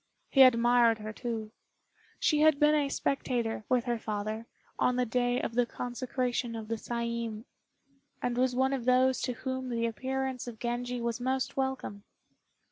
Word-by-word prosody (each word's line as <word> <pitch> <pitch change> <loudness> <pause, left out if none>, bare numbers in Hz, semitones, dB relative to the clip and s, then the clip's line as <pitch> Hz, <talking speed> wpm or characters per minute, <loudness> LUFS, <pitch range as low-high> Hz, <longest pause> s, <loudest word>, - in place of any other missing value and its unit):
He 270 - +6
admired 240 -2 +6
her, 215 0 -6
too. 225 -2 -4 0.7
She 300 - +2
had 310 -2 +5
been 300 0 +5
a 290 -2 +2
spectator, 240 -6 -1
with 250 -2 +3
her 240 -2 -1
father, 215 +1 -4 0.3
on 250 - +3
the 250 0 +1
day 245 +1 +1
of - - -3
the 245 0 +2
consecration 245 -1 -2
of 220 -1 -7
the 230 - 0
Saiin, 235 -1 -3 0.7
and 245 -1 -1
was 250 0 +1
one 265 +1 +2
of 255 -3 -3
those 255 +1 +3
to 250 - -1
whom 260 +1 -4
the 230 -1 0
appearance 260 +2 -3
of 235 -2 -7
Genji 245 +1 -3
was 235 0 -2
most 260 +1 -1
welcome. 265 -7 -3
245 Hz, 165 wpm, -30 LUFS, 230-260 Hz, 0.7 s, He